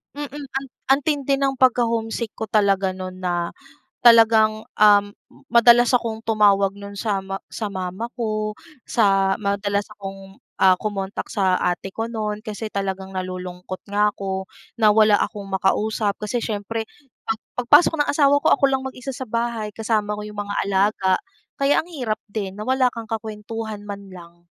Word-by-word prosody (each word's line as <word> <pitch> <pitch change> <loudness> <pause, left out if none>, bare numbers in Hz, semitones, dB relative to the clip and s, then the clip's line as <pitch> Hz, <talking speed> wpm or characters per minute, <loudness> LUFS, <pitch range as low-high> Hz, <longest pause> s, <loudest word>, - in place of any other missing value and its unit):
Mm. 290 -1 -5
An 290 +1 -7 0.4
ang 270 +2 +4
tindi 280 -2 +1
ng 270 -1 -1
pagka-homesick 230 -3 +1
ko 220 - -6
talaga 195 -3 +2
no'n 185 0 -7
na 175 -2 -1 0.5
talagang, 220 -2 +6 0.2
um, 205 -1 +7 0.5
madalas 235 0 +6
akong 230 -3 0
tumawag 205 -3 +3
no'n 200 0 -9
sa 200 -1 -1
ma 195 0 -5
sa 215 - -3
mama 190 +3 -4
ko. 215 -3 -2 0.3
Sa 195 -3 +3
madalas 200 0 0
akong, 195 -1 -10 0.2
ah, 185 -1 +5
kumontak 200 -2 -4
sa 190 -4 +2
ate 180 +2 -1
ko 225 +3 -3
no'n 215 -2 -3
kasi 215 0 -5
talagang 195 -1 -3
nalulungkot 185 -1 -6
nga 210 +1 +3
'ko, 190 -1 -4 0.3
na 215 -2 +6
wala 215 -2 +5
akong 205 -2 -3
makausap. 200 +2 0
Kasi 225 +3 -1
siyempre, 220 0 -3 0.4
pag 225 0 -1 0.2
pagpasok 250 +7 +5
ng 295 - +2
asawa 285 -1 +4
ko, - - 0
ako 280 - -12
lang 265 0 -1
mag-isa 260 +1 -7
sa 260 0 -7
bahay, 230 -1 -2
kasama 215 -2 0
ko 210 - -6
'yong 210 0 -7
mga 205 0 -4
alaga. 195 -1 +2 0.5
Kaya 280 +2 +3
ang 345 - -17
hirap 240 -9 -2
din, 200 -3 -4
na 210 - -6
wala 260 0 +3
kang 230 -2 -8
kakuwentuhan 220 -1 -5
man 200 -1 -8
lang. 170 -1 -14
210 Hz, 160 wpm, -22 LUFS, 195-230 Hz, 0.5 s, um